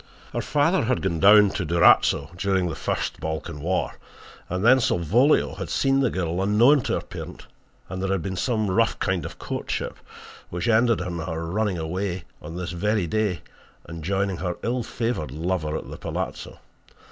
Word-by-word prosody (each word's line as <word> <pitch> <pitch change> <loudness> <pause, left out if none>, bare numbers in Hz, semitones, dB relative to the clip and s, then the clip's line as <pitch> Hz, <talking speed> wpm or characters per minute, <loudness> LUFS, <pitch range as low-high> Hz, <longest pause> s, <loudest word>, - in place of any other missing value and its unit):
"Her - - -1
father 150 +1 +2
had 130 +2 0
gone 85 -4 -1
down 105 +2 +7
to 100 - -3
Durazzo 80 -3 +4
during 95 0 0
the 85 - -3
first - - -3
Balkan 80 -2 -4
war 90 +4 -1 0.5
and 90 +4 -2
then 130 +2 +7
Salvolio 115 - +2
had - - -4
seen 135 0 +2
the 135 -3 +2
girl 90 -2 -2
unknown 115 +9 +5
to - - 0
her - - 0
parent, - - -9 0.4
and 95 +1 -5
there 95 - -1
had 95 -3 0
been 95 -1 -3
some 110 -1 0
rough 95 - +2
kind - - -1
of - - -11
courtship - - -4 0.5
which 90 +6 -3
ended 115 -2 +3
in 90 -1 -4
her 80 0 -4
running 100 +2 -1
away 90 +3 -3 0.2
on 80 +2 -8
this 90 0 -4
very 105 +2 0
day 100 0 -1 0.4
and 85 -1 -8
joining 95 +1 0
her 90 -1 -3
ill 120 +2 0
favoured 115 - -3
lover 80 +1 -2
at - - -8
the - - -8
palazzo. - - -5
95 Hz, 180 wpm, -24 LUFS, 85-110 Hz, 0.5 s, down